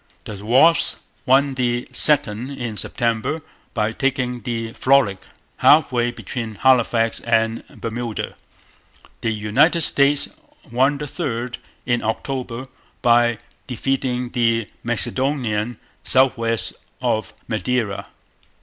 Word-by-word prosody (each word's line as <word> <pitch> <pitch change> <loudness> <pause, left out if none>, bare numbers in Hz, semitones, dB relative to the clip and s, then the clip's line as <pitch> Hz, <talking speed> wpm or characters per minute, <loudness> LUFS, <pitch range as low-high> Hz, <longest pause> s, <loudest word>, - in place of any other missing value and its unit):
The 100 -2 -7
Wasp 135 +10 +4 0.3
won 135 +2 +4
the 120 -2 -1
second 130 -5 +2
in 120 -3 -4
September, 115 +6 -1 0.4
by 105 -1 +1
taking 125 -1 -1
the 115 0 -4
Frolic 130 -8 +3 0.4
half 150 -1 +5
way 120 -1 +1
between 115 -2 -6
Halifax 115 -1 +3
and 115 -1 +1
Bermuda. 115 -1 -5 0.9
The - - 0
United 110 +11 +2
States 145 - +3 0.4
won 135 +4 +2
the 150 - -5
third 125 -5 -4 0.3
in 120 -1 0
October, 125 +2 -3 0.4
by 120 -1 +4 0.3
defeating 125 -1 -1
the 115 -3 +1 0.2
Macedonian 120 -2 -1 0.3
south 130 -1 +4
west 115 -4 -1 0.3
of 110 -1 -1 0.2
Madeira. 110 -1 -1
120 Hz, 105 wpm, -21 LUFS, 115-130 Hz, 0.9 s, half